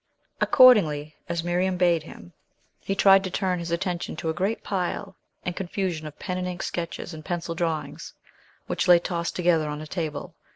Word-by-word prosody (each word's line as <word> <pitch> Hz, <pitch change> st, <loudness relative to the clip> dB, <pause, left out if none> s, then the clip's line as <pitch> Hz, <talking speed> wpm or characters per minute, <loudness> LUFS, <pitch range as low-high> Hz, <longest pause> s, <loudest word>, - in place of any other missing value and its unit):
Accordingly, 155 Hz, -, +5 dB, 0.2 s
as 170 Hz, -1 st, -1 dB
Miriam 180 Hz, +2 st, 0 dB
bade 175 Hz, -2 st, +3 dB
him, 85 Hz, -, -13 dB, 0.5 s
he 195 Hz, -, -3 dB
tried 195 Hz, -1 st, +6 dB
to 190 Hz, -, -3 dB
turn 185 Hz, -1 st, -1 dB
his 170 Hz, 0 st, -5 dB
attention 175 Hz, +1 st, -2 dB
to 165 Hz, 0 st, -3 dB
a -, -, 0 dB
great 195 Hz, +7 st, -1 dB
pile 195 Hz, 0 st, -3 dB, 0.3 s
and 180 Hz, -, -2 dB
confusion 180 Hz, -4 st, -3 dB
of 150 Hz, -, -11 dB
pen 185 Hz, -1 st, -4 dB
and 180 Hz, -, -2 dB
ink 180 Hz, 0 st, -4 dB
sketches 170 Hz, 0 st, -4 dB
and 155 Hz, -1 st, -9 dB
pencil 175 Hz, -1 st, -3 dB
drawings 165 Hz, -2 st, -3 dB, 0.5 s
which -, -, -1 dB
lay 175 Hz, -1 st, +8 dB
tossed 170 Hz, 0 st, -3 dB
together 170 Hz, -4 st, +2 dB
on 150 Hz, 0 st, -4 dB
a 155 Hz, -, -7 dB
table. 155 Hz, -3 st, -4 dB
175 Hz, 180 wpm, -25 LUFS, 165-185 Hz, 0.5 s, lay